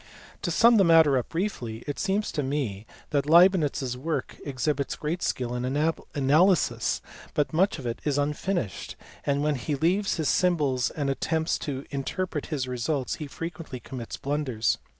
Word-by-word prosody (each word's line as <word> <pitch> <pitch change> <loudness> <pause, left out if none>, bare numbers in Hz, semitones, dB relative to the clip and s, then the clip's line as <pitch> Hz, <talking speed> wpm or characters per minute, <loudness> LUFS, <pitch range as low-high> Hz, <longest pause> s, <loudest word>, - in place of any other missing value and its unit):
To - - -2
sum 235 0 +6
the 195 - +6
matter 165 -5 +6
up 125 - -1
briefly, 130 - -3
it 145 - -4
seems 200 +2 0
to 150 - -1
me 130 -7 -2 0.2
that 145 -1 +1
Leibnitz 170 -3 +5
s 125 -1 -2
work 155 +6 -3
exhibits 140 +1 -1
great 165 +4 -3
skill 125 -1 -1
in 125 0 -2
analysis, 145 - +2 0.3
but 150 +1 +1
much 185 +4 +2
of 135 - -8
it 115 0 -3
is 145 -2 0
un 145 +1 +1
finished, 175 - -3 0.3
and 140 0 +1
when 150 0 +2
he 145 +2 -2
leaves 185 +8 +1
his 160 -3 -1
symbols 145 -9 +2
and 140 -3 -2
attempts 160 +4 0
to 140 -2 -4
interpret 150 +3 -3
his 135 -4 -2
results 125 +2 -2
he 150 - -5
frequently 165 -3 -6
commits 120 -2 -7
blunders. 135 -6 0
145 Hz, 170 wpm, -27 LUFS, 130-165 Hz, 0.3 s, sum